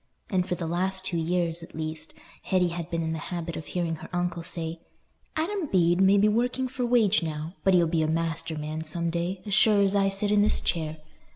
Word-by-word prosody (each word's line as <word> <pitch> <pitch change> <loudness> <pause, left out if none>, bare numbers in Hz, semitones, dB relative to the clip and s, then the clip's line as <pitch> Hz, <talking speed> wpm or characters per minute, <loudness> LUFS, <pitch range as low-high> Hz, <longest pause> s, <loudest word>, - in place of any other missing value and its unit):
And 185 -2 +1
for 180 - +1
the 175 - -4
last 185 +3 -1
two 175 -2 +2
years, 170 0 0
at 165 - -12
least, 155 0 -4 0.3
Hetty 180 -2 +1
had 170 0 -5
been 165 -1 -1
in 160 0 -2
the 160 - -3
habit 170 -2 -4
of 155 - -7
hearing 170 -2 -2
her - - -10
uncle 175 -1 -1
say, 165 0 -3 0.6
"Adam 340 +2 -1
Bede 175 -4 +3
may 195 +1 +6
be 205 +1 +5
working 245 +4 +1
for 255 0 -4
wage 225 -5 +4
now, 155 0 -4
but 190 -1 +4
he'll 175 -1 +5
be 165 0 +1
a 155 - +1
master 165 0 -1
man 155 +1 -4
some 170 +1 0
day, 175 +2 -3
as 205 - -2
sure 210 -2 +5
as 195 0 +2
I 195 -1 +3
sit 195 +1 0
in 210 -1 +4
this 210 - +3
chair. 160 -2 -2
175 Hz, 225 wpm, -27 LUFS, 165-195 Hz, 0.6 s, may